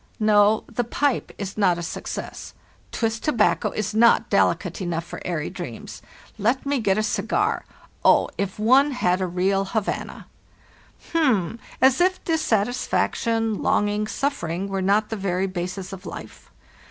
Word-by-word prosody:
"No, 215 0 +4
the 245 +1 -2
pipe 270 +3 -1
is 200 +1 -5
not 180 -4 +3
a 175 - -5
success. - - -6 0.4
Twist 225 -1 -2
tobacco 235 -8 +2
is 215 0 -3
not 230 +2 +4
delicate - - +1
enough 170 -2 -2
for - - -8
airy 165 -4 -3
dreams. - - -8 0.4
Let 235 +7 +1
me 280 -1 0
get 195 -3 +1
a 215 - +1
cigar. - - 0 0.4
Oh, - - +5
if 200 -1 -3
one 265 +7 +4
had 185 -7 +1
a 185 - 0
real 190 +2 +1
Havana! 205 +1 -3 0.9
"H'm! 235 - +1 0.2
as 265 +3 +4
if 370 +1 +2
dissatisfaction, 230 - 0
longing, 210 +1 +1
suffering. 195 - -2
were 195 -1 -2
not 205 +3 +2
the 225 - -3
very 190 -1 -1
basis 185 +1 -5
of 195 0 -9
life. - - -10
210 Hz, 145 wpm, -23 LUFS, 190-235 Hz, 0.9 s, Oh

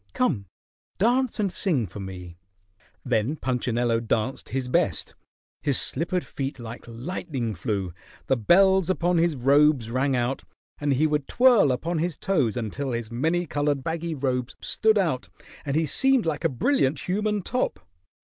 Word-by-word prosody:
Come, 145 - 0 0.5
dance 245 +4 +2
and 200 -3 +1
sing 160 - +1
for 95 +2 -9
me." 90 -3 -8 0.7
Then 125 +3 +1
Punchinello 120 -4 0
danced 115 +2 -2
his 130 -1 -2
best. 125 - 0 0.5
His 140 -4 +1
slippered 175 +5 -2
feet 135 0 -4
like 115 -1 -8
lightning 125 - -4
flew; 95 -1 -3 0.3
the 135 - +2
bells 190 - +4
upon 175 -1 +2
his 165 -2 +2
robes 135 -2 +3
rang 130 +2 +1
out, 125 +2 -1 0.4
and 145 -1 +1
he 145 +4 +2
would 150 -2 0
twirl 245 - +5
upon 160 +7 -1
his 170 -1 -1
toes 145 - 0
until 125 +4 -3
his 115 -1 -4
many 160 +9 0
colored 145 -3 -1
baggy 165 +1 -3
robes 130 -3 -2
stood 220 -1 +2
out 160 -10 0 0.4
and 140 -1 -1
he 160 +1 +2
seemed 265 - +2
like 160 -3 -2
a - - +3
brilliant 140 - 0
human 210 +2 0
top. 250 +6 -1
140 Hz, 155 wpm, -25 LUFS, 120-175 Hz, 0.7 s, twirl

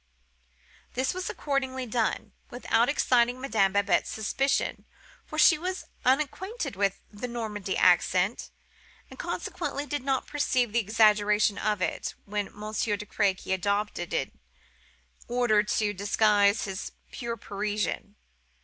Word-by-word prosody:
This 260 +1 0
was 370 0 -4
accordingly 265 -2 -2
done, 225 -2 -1 0.2
without 240 -1 +1
exciting 245 -3 +2
Madame 215 -7 +1
Babette's 200 -1 +2
suspicions, 270 +5 0 0.4
for - - -7
she 335 -4 +6
was 370 +2 -4 0.2
unacquainted 300 - 0
with 195 0 0
the 210 +4 -5
Normandy 215 -5 -3
accent, 185 +3 +3 0.6
and - - -12
consequently 285 - -3
did 290 0 -3
not 265 0 0
perceive 255 -6 0
the 235 - +3
exaggeration 210 -1 +3
of 210 -3 0
it - - -2
which 205 -1 -3
Monsieur 210 0 -2
de 210 - -7
Crequy 195 -2 0
adopted 200 -1 -1
in - - -1 1.0
order 240 -3 +3
to 210 0 0
disguise 205 +1 +3
his 190 -1 -5 0.2
pure 235 -1 -4
Parisian. 205 0 -3
215 Hz, 120 wpm, -28 LUFS, 205-255 Hz, 1.0 s, she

